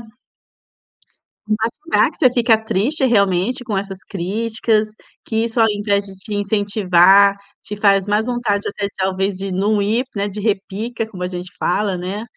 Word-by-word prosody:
É. 245 - -24 1.4
Mas 225 +1 0 0.2
falar - - +4
que - - -19
você 260 -5 +5
fica 230 -2 +4
triste 235 +8 0
realmente 200 +1 +1
com 215 - -2
essas 195 -1 -5
críticas, 215 +3 -1 0.4
que 225 0 -1
isso 235 +1 -3
ao 225 - +6
invés 205 -1 0
de 195 - -11
te 190 +3 -8
incentivar, 200 -1 +4 0.3
te 210 - -6
faz 200 -2 +3
mais 210 +2 +1
vontade 240 -5 -1
até, 200 0 -3
talvez, 190 +1 -1
de 195 0 -5
não 205 +3 +1
ir, 225 +6 0
né, 205 0 -1
de 205 - -7
repica, 215 +2 -2
como 185 -5 -7
a - - -1
gente 180 0 -7
fala, 195 0 0
né. 190 +5 -4
205 Hz, 170 wpm, -19 LUFS, 195-220 Hz, 1.4 s, ao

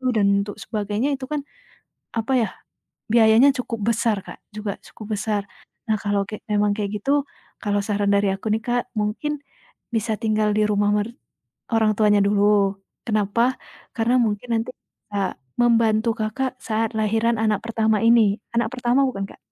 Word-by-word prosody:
dan 205 -2 +3 0.2
untuk 205 - -7
sebagainya 215 +4 -1
itu 260 - -6
kan 295 0 -2 0.7
apa 225 +3 -2
ya 220 - +1 0.7
biayanya 230 +4 +6
cukup 230 -3 -4
besar 225 -1 +1
Kak, - - -9
juga 210 -1 -4
cukup 215 0 -6
besar. 205 0 -1 0.5
Nah, 215 - +2
kalau 205 -1 0
ke 215 - -7
memang 210 0 +3
kayak 205 -2 -2
gitu 280 +4 +2 0.4
kalau 205 -1 0
saran 205 -1 0
dari 200 0 +3
aku 210 +2 -3
nih 220 - +1
Kak, 245 +1 0 0.2
mungkin 210 +8 -1 0.6
bisa 220 0 0
tinggal 215 -1 +1
di - - +3
rumah 205 0 +2
mer 210 +1 0 0.7
orang 220 -1 +3
tuanya 210 -1 +5
dulu. 200 -1 +3 0.3
Kenapa, 225 +3 +1 0.4
karena 230 +2 +2
mungkin 220 +1 -1
nanti 230 +2 -1 0.4
Kak, 200 -2 -2 0.2
membantu 230 -1 +3
Kakak, 255 +4 -2
saat 225 +1 -1
lahiran 225 +2 +1
anak 215 -2 +2
pertama 220 -2 +1
ini. 225 -4 +5 0.2
Anak 235 - +1
pertama 250 +1 +2
bukan 195 -7 -2
Kak? - - -14
215 Hz, 155 wpm, -23 LUFS, 205-230 Hz, 0.7 s, biayanya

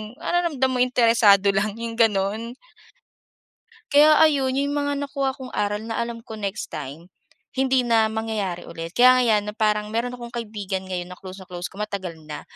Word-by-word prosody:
nararamdam 310 -4 0
mo 255 - -1
interesado 230 -5 +4
lang, 200 +1 -1
‘yong 230 0 -6
gano'n. 220 +2 +1 1.4
Kaya 300 +1 +7
ayon, 285 -4 +4
'yon 285 +1 0
mga 285 -1 -1
nakuha 275 -1 -1
kong 260 -1 -9
aral 205 0 0
na 225 - -4
alam 235 0 -5
ko 225 -1 -10
next 200 -5 -5
time, 150 +3 -7 0.5
hindi 265 -1 +1
na 225 -2 +3
mangyayari 220 -5 -3
ulit. 165 0 -7
Kaya 250 +7 +6
nga 255 - +3
‘yan 220 -4 +3
na 210 - -5
parang 210 0 0
meron 235 +2 0
akong 240 -1 -9
kaibigan 205 -5 -4
ngayon 180 -1 -3
na 180 - -8
close 185 0 -10
na 190 - -12
close 180 -1 -6
ko 195 - -14
matagal 195 -5 -5
na, 150 -1 -7
225 Hz, 180 wpm, -23 LUFS, 200-255 Hz, 1.4 s, Kaya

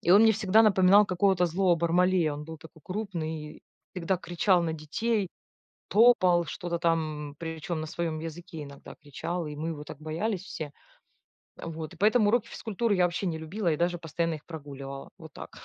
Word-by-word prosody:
И - - 0
он 205 - +8
мне 225 - +7
всегда 215 +2 +4
напоминал 200 -1 +6
какого-то 185 -1 +2
злого 180 +1 +2
Бармалея. 170 -1 +2
Он 145 +1 -6
был 160 +1 -8
такой 160 0 -15
крупный, 165 -6 -5 0.3
всегда 185 +1 -1
кричал 175 +1 +2
на 165 - -1
детей, 200 +7 -1 0.6
топал, 185 -7 +5
что-то 170 -1 -4
там, 155 -3 -1
причем 160 0 -4
на - - -4
своем 160 0 -3
языке 165 0 -7
иногда 140 -1 -11
кричал, 165 +3 -5
и 150 -1 -6
мы 155 +2 -4
его 150 -2 -5
так 145 0 -10
боялись 170 +6 -2
все. 155 -6 -6 0.9
Э, - - -7
вот, 160 0 -6
и - - -14
поэтому 215 +1 +4
уроки 230 +1 +2
физкультуры 220 0 -1
я 180 -2 +3
вообще 175 +2 -1
не 165 -2 -1
любила 170 +3 -2
и 150 - 0
даже 175 +1 0
постоянно 165 +1 -2
их 150 - -10
прогуливала. 140 -4 -8
Вот 160 -2 -12
так. - - -9
170 Hz, 185 wpm, -28 LUFS, 155-190 Hz, 0.9 s, он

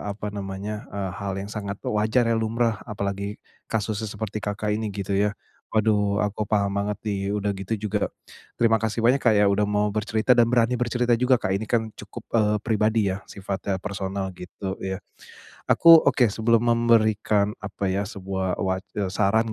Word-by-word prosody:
apa 105 0 -5
namanya, 100 +1 -5
eee, 100 -2 -4
hal 100 -1 -2
yang 100 +1 -5
sangat 100 -2 -4
wajar 110 +4 +2
ya, 115 - +1
lumrah. 115 -1 0
Apalagi 100 -1 -3 0.3
kasusnya 110 0 -2
seperti 105 0 -5
Kakak 105 +1 -2
ini, 110 +1 -1
gitu 100 -1 -4
ya. 100 +1 +1 0.3
Waduh, 105 -2 +1
aku 105 +1 -2
paham 100 -2 +2
banget, 105 +1 -1
nih. 100 -2 -1 0.2
Udah 105 0 -1
gitu 95 +3 -3
juga, 105 0 0 0.5
terima 115 -1 +4
kasih 110 +1 -1
banyak, 130 +4 +5
Kak, 110 -3 +4
ya, 105 - +5
udah 105 +1 +2
mau 105 0 +1
bercerita 110 +2 -1
dan 120 -1 +5
berani 120 0 +3
bercerita 120 0 +1
juga, 125 +1 +4
Kak. 95 - -1
Ini 110 +3 -2
kan 115 -2 +2
cukup, - - -10
eee, 105 -1 +3
pribadi 110 -1 +2
ya, 95 - -8
sifatnya 100 0 -3
personal, 95 -1 -4
gitu 95 +2 -6
ya. 95 0 -3 0.7
Aku 165 -1 +8
oke 125 -2 +3
sebelum 115 +1 +2
memberikan, 110 -3 +3
apa 100 -1 -3
ya, 100 +2 0
sebuah 95 -1 -3
wac 95 0 -1
eee, 100 -3 -1
saran 110 +3 +2
105 Hz, 175 wpm, -24 LUFS, 100-110 Hz, 0.7 s, Aku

